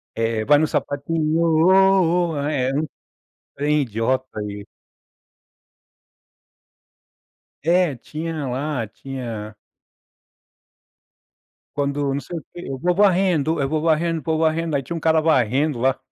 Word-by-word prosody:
É 115 -1 -1
vai 145 +3 +5
no 155 - +2
sapatinho 155 +3 -1
ô, 175 +1 +4
ô. - - -4
Era 140 -2 0
um 155 - -1 0.7
trem 150 +1 +1
idiota 130 0 -2
e 100 0 -7 3.0
É, 175 -3 +3
tinha 155 +4 -5
lá. 130 0 -2
Tinha 115 -3 -7 2.2
Quando 140 -1 -1
não 140 - -2
sei 175 - -7
o 160 - -9
quê 175 - -8
eu 135 - -4
vou 175 +7 +1
varrendo, 180 -5 +2
eu 140 - +1
vou 155 +2 -1
varrendo, 165 0 +1
vou 160 +2 0
varrendo. 160 0 0
Aí 135 - 0
tinha 170 +7 -5
um - - -3
cara 160 0 +3
varrendo 140 -2 +1
lá. 130 +2 +2
150 Hz, 125 wpm, -22 LUFS, 135-165 Hz, 3.0 s, vai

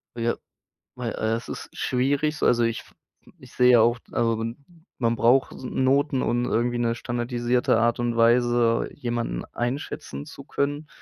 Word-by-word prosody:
Ja, 115 0 0 0.6
weil, 120 -2 -3
äh, 110 +1 -1
es 115 - -8
ist - - -6
schwierig 140 +4 0
so. - - 0
Also 120 -1 +4
ich 115 0 -1
f - - -19 0.5
ich - - -15
sehe 125 0 +5
ja 120 - +7
auch 120 +2 +3
also 115 -1 +1
man 115 +1 -4 0.4
man 115 -1 +1
braucht 120 +4 +3
Noten, 135 +2 +1
und 120 +1 0
irgendwie 120 +2 0
'ne 115 -1 +1
standardisierte 120 0 0
Art 115 0 +2
und 120 -1 -1
Weise 120 0 +3
jemanden 120 -3 -3
einschätzen 140 +4 -4
zu 140 -2 -11
können. 145 +2 -2
120 Hz, 165 wpm, -25 LUFS, 115-130 Hz, 0.6 s, ja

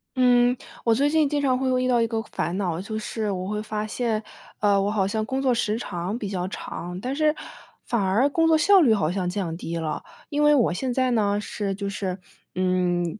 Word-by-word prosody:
嗯， 245 -1 +4 0.3
我 230 -1 +3
最 280 +5 +2
近 310 -1 +3
经 290 0 0
常 260 -2 +2
会 265 - 0
又 255 - +2
遇 255 - 0
到 245 -2 +3
一 230 - +2
个 225 -1 -2
烦 175 -4 -3
恼， 180 -4 -1
就 215 +3 -5
是 215 0 -3
我 185 -1 -3
会 210 +1 -2
发 215 0 -3
现， 220 0 -1 0.4
呃， 200 -1 +3
我 200 - 0
好 200 -3 +1
像 215 +2 -1
工 265 +4 -2
作 260 -2 +3
时 220 -2 0
长 185 -1 -4
比 215 - -4
较 185 -2 -2
长， 180 -1 -6
但 255 +3 -3
是 305 +1 +2 0.5
反 235 -3 0
而 200 +8 +3
工 325 +3 +2
作 320 -1 +5
效 385 +5 +6
率 250 -8 +5
好 165 -7 +1
像 180 -1 -1
降 180 -3 -3
低 170 -1 -5
了。 160 -2 -3 0.3
因 295 0 -1
为 295 0 +6
我 240 -9 +3
现 255 +8 -2
在 255 0 +1
呢， 205 -3 +2
是 205 -1 -3
就 200 0 -4
是， 190 -2 -3 0.4
嗯， 180 0 0
215 Hz, 245 characters per minute, -24 LUFS, 190-255 Hz, 0.5 s, 效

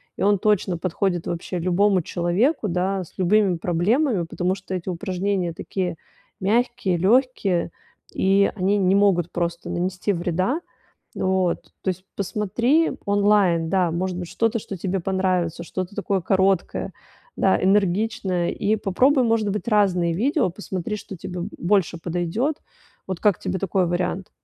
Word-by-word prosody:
и - - -8
он 205 +1 +4
точно 200 -3 +1
подходит 175 0 -1
вообще 175 +1 -4
любому 185 +2 +2
человеку, 190 - 0
да, 185 +2 -1
с 170 - -16
любыми 190 0 +3
проблемами, 185 - +1
потому 180 +2 -1
что 190 -1 -6
эти 180 +1 -4
упражнения 185 0 -2
такие 180 +1 -3 0.4
мягкие, 220 -2 +1
лёгкие, 195 -4 +2 0.4
и 195 +1 +3
они 200 +1 +1
не 190 -1 +3
могут 190 -4 +3
просто 170 0 -3
нанести 180 +3 -1
вреда. 185 - 0 0.6
Вот, 185 -2 0
то - - -3
есть 185 0 -2
посмотри 230 - +1
онлайн, 200 -5 +3
да, 180 -1 +2
может 180 +2 -2
быть, 180 -1 -5
что-то, 225 +2 0
что 195 - -7
тебе 190 +1 -2
понравится, 185 -2 -1
что-то 185 +3 -5
такое 195 -2 0
короткое, 190 0 +1 0.4
да, 190 - +3
энергичное, 195 -2 +1
и 215 +2 0
попробуй, 250 +7 +3
может 225 -2 +1
быть, 210 +3 -3
разные 190 -6 +2
видео, 250 - +1
посмотри, 190 +1 -5
что 195 - -9
тебе 180 +1 -6 0.2
больше 175 -2 +1
подойдёт. 180 - -1 0.5
Вот 185 - -3
как 205 -2 +2
тебе 190 0 -2
такой 190 -1 +1
вариант? 180 +1 -2
190 Hz, 140 wpm, -23 LUFS, 175-205 Hz, 0.6 s, он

